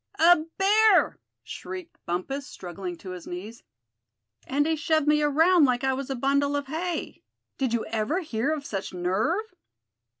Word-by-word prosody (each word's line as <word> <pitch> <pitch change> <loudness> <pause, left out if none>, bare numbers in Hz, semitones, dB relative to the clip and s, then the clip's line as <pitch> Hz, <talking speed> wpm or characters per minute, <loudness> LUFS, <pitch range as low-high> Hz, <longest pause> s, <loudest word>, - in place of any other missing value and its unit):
"A 335 0 +6
bear!" 415 +1 +4 0.2
shrieked 360 -1 -8
Bumpus, 265 +11 -3
struggling 180 -4 -7
to 185 - -9
his 180 -2 -8
knees; 205 +6 -7 0.9
"and 285 +2 +1
he 320 0 +1
shoved 315 -1 +1
me 300 0 +4
around 320 +3 +5
like 250 -1 +1
I 265 0 +2
was 270 0 -4
a 270 - -1
bundle 280 +3 +1
of 285 0 -2
hay! 325 +4 -4 0.4
Did 260 -3 0
you 235 -1 0
ever 225 - -1
hear 275 -3 -1
of 300 -2 -3
such 195 -5 -5
nerve?" 220 - -1
280 Hz, 160 wpm, -26 LUFS, 220-320 Hz, 0.9 s, A